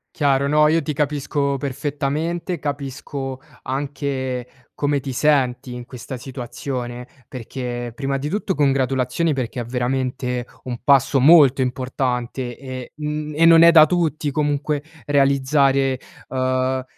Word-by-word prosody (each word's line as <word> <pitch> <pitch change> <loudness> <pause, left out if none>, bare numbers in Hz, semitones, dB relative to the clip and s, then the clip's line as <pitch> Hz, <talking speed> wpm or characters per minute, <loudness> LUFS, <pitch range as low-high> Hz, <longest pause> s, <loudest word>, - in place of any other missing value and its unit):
Chiaro, 140 -3 +2
no, 150 +1 +4
io 165 +1 +3
ti 150 0 -3
capisco 140 -1 -1
perfettamente, 145 +6 -2
capisco 140 -2 -5 0.2
anche 135 -2 -3 0.3
come 145 -1 0
ti 135 0 -5
senti 130 -3 +1
in 125 0 -7
questa 125 +1 -8
situazione, 125 -1 -6 0.2
perché, 120 -1 -5
prima 135 +1 -2
di 140 +2 -4
tutto, 195 +1 -2
congratulazioni 135 +2 +1
perché 125 -1 -3
è 120 - -3
veramente 125 0 -2 0.2
un 125 -2 -5
passo 135 0 +4
molto 140 -2 +6
importante 125 -1 -2
e, 130 -2 -8
mhmm, 150 0 -4
e 165 +2 +4
non 165 0 +8
è 170 - +9
da 155 -2 +8
tutti 155 -3 0
comunque, 145 0 -1 0.2
realizzare, 135 -1 +2 0.3
uhm, 130 0 0
135 Hz, 125 wpm, -21 LUFS, 130-145 Hz, 0.3 s, è